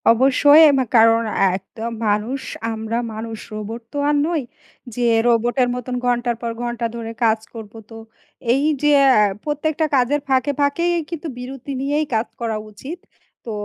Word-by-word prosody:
অবশ্যই, 275 +5 +6 0.2
মা 260 - +1
কারণ 225 +1 +5
এ - - -5 0.2
একদম 220 +4 -7 0.2
মানুষ, 220 +6 -1 0.3
আমরা 220 +1 -3 0.2
মানুষ 220 0 -6
রোবট 215 +2 -6
তো - - -4
আর 295 - +2
নই 330 -2 0 0.5
যে 245 - 0 0.2
রোবটের 240 +2 +2
মতন 250 0 -4
ঘন্টার 240 -1 0
পর 235 -1 -2
ঘন্টা 240 -1 -3
ধরে 230 -1 -5
কাজ 220 -1 +3
করব 220 -3 -9 0.2
তো। 225 - -11 0.6
এই 275 +2 +1 0.2
যে 295 0 +3 0.3
আ - - +5 0.2
প্রত্যেকটা 305 +1 -1
কাজের 270 +3 +2
ফাঁকে, 265 +1 +2
ফাঁকেই 335 +5 +1 0.2
কিন্তু 335 -1 -5
বিরতি 260 +2 -7
নিয়েই 290 +3 0
কাজ 220 +2 0
করা 225 -2 -1
উচিত। 275 - -8 0.5
তো 230 - -5
245 Hz, 160 wpm, -20 LUFS, 225-285 Hz, 0.6 s, অবশ্যই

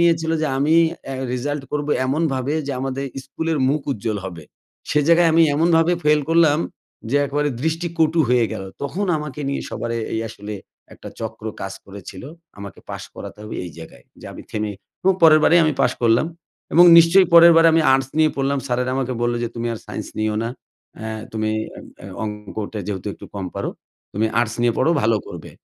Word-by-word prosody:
নিয়েছিলো 165 -1 +2
যে - - +1
আমি 150 +4 +2 0.3
অ্যা 135 - -5 0.2
রেজাল্ট 145 +3 -3
করব 150 0 -2 0.2
এমনভাবে, 140 -1 -1
যে 140 - -2
আমাদের 135 +1 -3 0.2
স্কুলের 160 +3 -3
মুখ 150 +2 +1
উজ্জ্বল 105 -2 -3
হবে। 85 -4 -9 0.5
সে 150 - +3
জায়গায় 170 0 +5
আমি 165 +1 +5
এমনভাবে 165 +2 +3
ফেল 150 0 +4
করলাম, 160 -3 +4 0.5
যে 145 - +2
একেবারে 145 +1 0
দৃষ্টি 165 +2 -1
কটু 160 +1 +3
হয়ে 125 -2 +3
গেলো। 95 -3 -6
তখন 175 +9 -2
আমাকে 150 -1 -7
নিয়ে 140 - -2
সবার 115 - -4
এ - - -3
এই 110 - -1
আসলে, 105 -1 -8 0.4
একটা - - -11
চক্র 110 -1 -6 0.2
কাজ 95 0 -4
করেছিল, 95 -1 -10 0.4
আমাকে 100 -1 -9
পাশ - - -6
করাতে - - -9
হবে, 105 - -7
এই 90 - -7
জায়গায়। 80 -7 -12 0.2
যে - - -10
আমি - - -10
থেমে 105 -1 -3 0.3
এবং 190 +1 +4
পরেরবারেই 160 +2 +6
আমি 155 - +2
পাশ 125 - +3
করলাম। 115 +5 +3 0.5
এবং 175 - +8
নিশ্চয়ই 180 +3 +6
পরের 170 0 +9
বার 165 - +6
আমি 165 - +4
আর্টস 135 0 +1
নিয়ে 155 -1 +4
পড়লাম। 140 +1 0
স্যারেরা 125 0 -1
আমাকে 130 -1 -1
বললো 120 0 +1
যে, 120 - -1
"তুমি 120 0 -3
আর 110 - -5
সায়েন্স - - -6
নিও 110 0 0
না। 115 - -2 0.5
অ্যা 110 0 -5 0.2
তুমি 110 -1 -1 0.2
অ্যা - - -11 0.2
অ্যা 90 - -10 0.2
অঙ্কটা 105 0 -5
যেহেতু 100 0 -4
একটু - - -12
কম 100 -2 -4
পারো, - - -3 0.4
তুমি 110 +3 0
আর্টস 120 -1 -1
নিয়ে 120 -1 +3
পড়ো, 160 - +3
ভালো 110 0 +3
করবে।" - - -9
135 Hz, 190 wpm, -21 LUFS, 110-160 Hz, 0.5 s, পরের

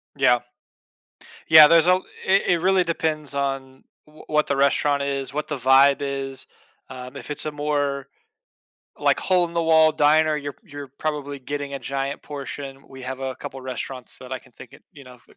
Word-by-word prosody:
Yeah. 130 -3 +4 1.1
Yeah, 155 -1 +10
there's 165 +1 +5
al 185 +1 +3 0.2
i - - -2
it 180 -3 +3
really 190 0 +3
depends 155 -3 -2
on 135 -1 -4 0.2
wh 155 0 -17
what 150 0 +2
the 140 - -1
restaurant 140 +1 +2
is, 140 -1 -3
what 150 0 -3
the 150 - -3
vibe 135 +2 +5
is, 135 -1 -4 0.4
um, 125 +1 -9
if 140 - -9
it's 150 - -3
a 155 - -3
more, 145 -2 -2 0.9
like, - - +2
hole-in-the-wall 165 -3 +3
diner, 155 +1 +3
you're 145 -1 -5
you're 145 -6 -9
probably 145 -2 -3
getting 140 +1 -5
a - - -3
giant 135 +1 -4
portion. 140 -1 -8
We 130 -1 -12
have 130 +1 -6
a 130 -1 -3
couple 135 - -8
restaurants 130 0 -6
that 130 0 -10
I 130 - -3
can 130 0 -22
think 125 - -14
it - - -16
you 140 - -14
know, 125 -1 -14
that - - -23
140 Hz, 180 wpm, -23 LUFS, 135-155 Hz, 1.1 s, Yeah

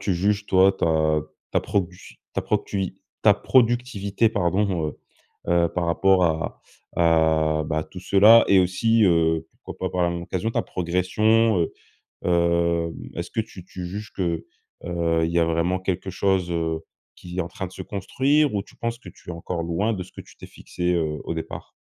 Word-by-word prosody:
tu 95 - 0
juges 105 +3 0
toi 95 +1 +5
ta 80 -4 +1 0.3
ta - - +2
produ 90 -2 -4
ta - - -2
proctui 95 -3 -2 0.2
ta - - +6
productivité, 120 -4 +2
pardon, 95 -4 0 0.6
heu - - +3
heu, 85 -1 +3
par 90 0 -2
rapport 95 +2 +3
à 80 -1 -2 0.3
à, 80 -2 +3
bah, 80 0 -1
tout 90 - -11
cela 105 +5 +7
et 95 -1 +6
aussi, 110 +5 +2
heu, 80 -3 +2 0.2
pourquoi - - -4
pas - - -12
par 90 - +2
la 85 - +1
même 85 0 -4
occasion 95 +5 -2
ta - - 0
progression? 105 +5 +1
Heu, 85 - 0 0.5
hem, 85 -1 +1 0.2
est-ce 85 +1 -5
que 115 - -1
tu 95 -5 -9
tu 90 0 -7
juges 105 +4 -7
que, 85 -4 -2 0.4
heu, 85 -1 0
il 80 - -1
y 85 - +2
a 85 - +4
vraiment 85 +3 0
quelque 95 0 -3
chose, 95 -1 0
heu, 80 -1 -1 0.4
qui 90 +1 -9
est - - +3
en 85 - -7
train 95 +1 -6
de - - -18
se - - -7
construire 135 +9 +1
ou 100 - 0
tu - - -19
penses 115 0 -3
que 120 - -13
tu - - -21
es - - -4
encore 85 0 -4
loin 90 +7 0
de 95 -4 -3
ce 90 - -13
que - - -10
tu - - -19
t'es - - -11
fixé, 90 0 -3
heu, 80 -3 -1
au - - -3
départ? 80 - -7
90 Hz, 195 wpm, -24 LUFS, 85-100 Hz, 0.6 s, cela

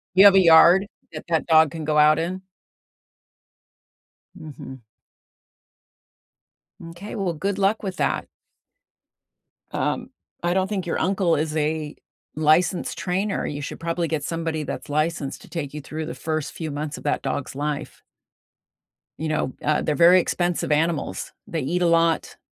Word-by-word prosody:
You 195 +2 +8
have 200 -1 +8
a - - +8
yard 175 +3 +7 0.3
that 155 - -7
that 160 -2 +1
dog 160 -2 +5
can 160 -2 -6
go 155 -1 +1
out 150 0 +5
in? 180 +3 -3 1.9
Mhm. 135 -7 -10 2.0
M'kay. 175 +5 -9
Well, 195 -5 -1
good 195 +5 -2
luck 200 +2 +1
with 190 -2 -4
that. - - -1 1.4
Um, - - -2 0.3
I 175 0 +1
don't 190 0 +1
think 195 -3 -3
your 170 - -2
uncle 185 -2 +1
is 155 +1 -2
a 155 0 -2 0.4
licensed 160 +4 +2
trainer. 190 +3 -1
You 145 0 -4
should - - -6
probably 165 0 -2
get 155 -2 -2
somebody 165 -1 -3
that's - - -6
licensed 155 -1 -2
to - - -15
take 150 -5 -5
you 150 - -6
through 155 +3 -6
the 165 - -5
first 155 -2 -3
few 160 -2 -5
months 150 +2 -4
of - - -11
that 145 - -1
dog's 135 - -3
life. 145 +1 -4 1.2
You 160 +1 -3
know, 150 -4 -1
uh, 150 0 +1
they're 150 - -1
very 175 +3 +7
expensive 175 -2 -1
animals. 150 - -1
They 165 -3 -3
eat 175 +7 -1
a 175 - +3
lot, 165 -1 +1
160 Hz, 155 wpm, -23 LUFS, 150-175 Hz, 2.0 s, You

